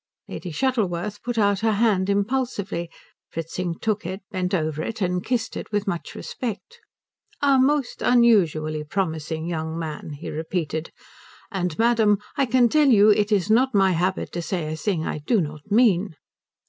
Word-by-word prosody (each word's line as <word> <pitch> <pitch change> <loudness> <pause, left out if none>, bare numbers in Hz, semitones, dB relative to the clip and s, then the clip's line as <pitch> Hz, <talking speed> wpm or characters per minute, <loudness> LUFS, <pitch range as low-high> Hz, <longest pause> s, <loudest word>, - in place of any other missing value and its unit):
Lady 180 - -6
Shuttleworth 205 - -1
put 240 -1 -4
out 200 -2 +3
her 220 0 +2
hand 200 -3 +2
impulsively. 200 -5 -1 0.4
Fritzing 165 +1 -4
took 215 -2 -1
it, 185 +3 -6
bent 185 -1 -2
over 155 -4 -1
it, 220 +6 -4
and 180 -2 0
kissed 240 -2 -2
it - - -6
with 205 -1 0
much 175 -5 -4
respect. 255 - -6 0.6
"A 280 -2 +4
most 275 0 +1
unusually 170 -11 +3
promising 160 -2 -3
young 160 -1 -3
man," 155 -2 -5
he 145 +3 -7
repeated; 160 0 -3 0.6
"and, 180 -5 -2
madam, 225 -3 +4 0.2
I 275 - +1
can 245 +1 +4
tell 300 +4 +3
you 215 -3 +6
it 210 +1 +2
is 205 0 +2
not 255 +2 +3
my 195 -1 +4
habit 180 +2 -1
to 175 - -3
say 165 -3 -3
a - - -3
thing 160 0 -1
I - - -3
do 210 +10 +1
not 155 +1 -5
mean." 205 -5 +3
195 Hz, 165 wpm, -24 LUFS, 165-225 Hz, 0.6 s, you